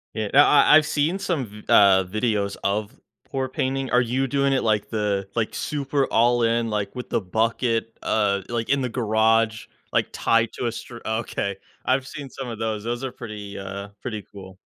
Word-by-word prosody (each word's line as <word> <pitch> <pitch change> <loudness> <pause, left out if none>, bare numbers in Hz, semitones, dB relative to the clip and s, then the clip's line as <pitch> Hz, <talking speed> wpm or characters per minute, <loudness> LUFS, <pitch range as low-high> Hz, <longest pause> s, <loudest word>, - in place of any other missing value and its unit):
Yeah, 110 -2 -2
I 145 +1 +7
I - - +11
I've 155 - +3
seen 155 +5 0
some, 175 -9 -1
v 105 0 -13
uh, 95 -2 +6
videos 105 0 -1
of 105 +1 -1 0.3
pour 130 -1 -3
painting, 135 +1 -2
are 125 - +5
you 130 +2 0
doing 140 +1 +1
it, 135 - +1
like 110 -2 +1
the 105 -3 -1
like, 115 -2 -1
super 140 -1 -1
all 120 +2 +3
in, 115 0 +1
like, 105 +1 -2
with 125 - -6
the - - +1
bucket, 115 +3 -1
uh, 100 -2 +1
like, 115 -1 -3
in 140 - +3
the 130 - 0
garage, 110 -1 +2 0.3
like, - - +1
tied 115 -1 +2
to - - -4
a - - -1
str 120 +1 -8
Okay. 110 -3 -2 0.3
I've 130 +1 +1
seen 140 -1 -7
some 135 0 -7
of 115 -2 -5
those. 110 -2 -2
Those 120 +2 -3
are 135 - -3
pretty, 105 -5 -8
uh, 100 +1 -6
pretty 110 -5 -5
cool. 95 -2 -11
115 Hz, 195 wpm, -24 LUFS, 105-130 Hz, 0.3 s, I